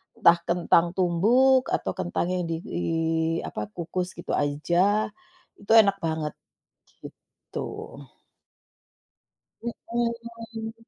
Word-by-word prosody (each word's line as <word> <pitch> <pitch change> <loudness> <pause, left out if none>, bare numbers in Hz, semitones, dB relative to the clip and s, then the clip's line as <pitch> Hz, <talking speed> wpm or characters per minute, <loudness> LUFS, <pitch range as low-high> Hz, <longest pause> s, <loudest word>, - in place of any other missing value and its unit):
entah 170 0 +6
kentang 170 0 +3
tumbuk 235 +10 +4
atau - - 0
kentang 175 -1 -1
yang 180 -1 -1
di 165 0 -3 0.8
apa, 105 - -5
dikukus 175 - -4
gitu - - -7
aja, 175 +9 +1 0.5
itu 200 - -5
enak 200 -2 +1
banget, 160 -2 -2 0.7
gitu. - - -10 2.0
Mhm. 230 -1 -4
185 Hz, 90 wpm, -26 LUFS, 170-230 Hz, 2.0 s, entah